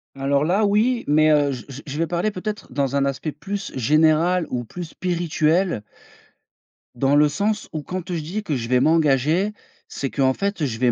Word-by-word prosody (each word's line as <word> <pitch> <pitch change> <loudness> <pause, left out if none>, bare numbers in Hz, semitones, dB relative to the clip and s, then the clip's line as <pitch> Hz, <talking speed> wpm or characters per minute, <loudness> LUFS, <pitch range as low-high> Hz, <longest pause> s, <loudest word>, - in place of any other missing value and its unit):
Alors 140 +2 +1
là, 195 +5 +2
oui, 225 +4 +2
mais 155 +1 +4
heu, 145 -2 +3
je 125 -3 -6
je 135 +1 -8
je 145 +1 -6
vais 165 0 0
parler 175 +5 -1
peut 185 - -7
être 210 -8 -5
dans 140 0 0
un 140 0 +2
aspect 140 +3 -2
plus 195 +7 -5
général 155 +6 +3
ou 125 -1 -2
plus 175 +9 -7
spirituel 170 - 0 1.1
dans 135 +3 +2
le 150 +1 +6
sens, 210 +6 -1
où, 155 -2 -4
quand, 185 -1 -5
heu, - - -1
je 160 - -2
dis 195 +8 -4
que 150 -8 -2
je 115 -1 -4
vais 125 - +4
m'engager. 160 +6 +2 0.3
C'est 135 - -4
qu'en 130 -2 +2
fait, 200 -3 -2
je 115 -4 -4
vais 125 -1 +3
155 Hz, 205 wpm, -22 LUFS, 140-185 Hz, 1.1 s, le